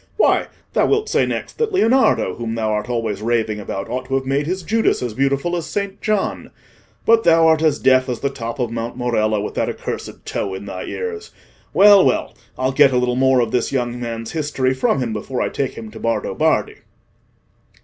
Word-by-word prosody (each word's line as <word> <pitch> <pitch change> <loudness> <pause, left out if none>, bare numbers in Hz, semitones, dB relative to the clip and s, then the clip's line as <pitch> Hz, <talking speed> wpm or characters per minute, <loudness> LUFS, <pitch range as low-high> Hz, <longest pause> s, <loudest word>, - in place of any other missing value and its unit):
Why, - - +3 0.3
thou - - +3
wilt 430 +1 +1
say - - +2
next - - -5
that 455 -2 0
Leonardo, 260 - +3
whom 115 +2 -4
thou 110 -1 -1
art 105 +3 -2
always 115 -4 -2
raving 110 -2 0
about, 95 -1 -5
ought 130 +1 -4
to 135 +1 -2
have 135 0 -1
made 140 +2 0
his 185 +1 -2
Judas 220 - +1
as 120 -3 -3
beautiful 140 +7 0
as 170 -3 -3
Saint 200 -1 -4
John! 210 -2 -1 0.6
But 225 0 +5
thou 165 -1 +5
art 160 -1 +4
as 155 -2 +2
deaf 130 0 +3
as 120 - -3
the 140 - -1
top 115 -2 -5
of 120 -4 -2
Mount 115 +1 -4
Morello 110 -4 0
with 105 - -5
that - - -1
accursed - - -6
tow 95 -1 -3
in 95 +1 -8
thy 95 -2 -6
ears. 445 -2 -5 0.4
Well, 200 -1 +7
well: 130 - 0 0.2
I'll 130 +1 0
get 135 0 +5
a 125 - +1
little 125 0 +1
more 130 0 +3
of 115 -2 -1
this 125 - 0
young 120 -2 -2
man's 115 -1 -5
history 145 -4 -1
from 130 +1 +1
him 115 -2 -3
before 115 +4 -4
I - - 0
take 135 -2 -3
him 110 -1 -8
to 110 - -10
Bardo 115 0 -1
Bardi." - - +1
130 Hz, 210 wpm, -20 LUFS, 115-160 Hz, 0.6 s, Well